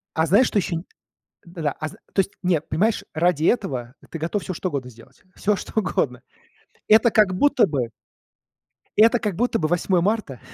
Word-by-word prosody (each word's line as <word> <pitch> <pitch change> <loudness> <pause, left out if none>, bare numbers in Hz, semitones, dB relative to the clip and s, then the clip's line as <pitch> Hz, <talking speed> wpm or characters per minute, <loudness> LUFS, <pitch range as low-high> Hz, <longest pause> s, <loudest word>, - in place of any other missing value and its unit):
А 160 0 +2
знаешь, 210 +9 +4
что 205 - +1
еще 175 -2 -2
нь 165 - -4 0.6
Да-да, 165 -4 -3
а 155 - -3
зн - - -11 0.2
То - - 0
есть 195 +1 +1
нет, 170 -4 0
понимаешь, 215 +6 0
ради 165 -1 +1
этого 130 - 0 0.2
ты 165 - -5
готов 170 +6 -2
всё 185 - -4
что 185 +2 -3
угодно 130 -4 -4
сделать. 115 -1 -18
Всё 210 +1 +1
что 220 - -3
угодно. 125 - -1 0.7
Это 220 +2 +6
как 210 -4 +3
будто 285 +3 +4
бы 130 -7 -2 1.1
Это 230 +2 +5
как 205 -5 -2
будто 245 +3 +1
бы 155 - 0
8 175 +1 +1
марта. 205 - -1
180 Hz, 190 wpm, -23 LUFS, 155-210 Hz, 1.1 s, Это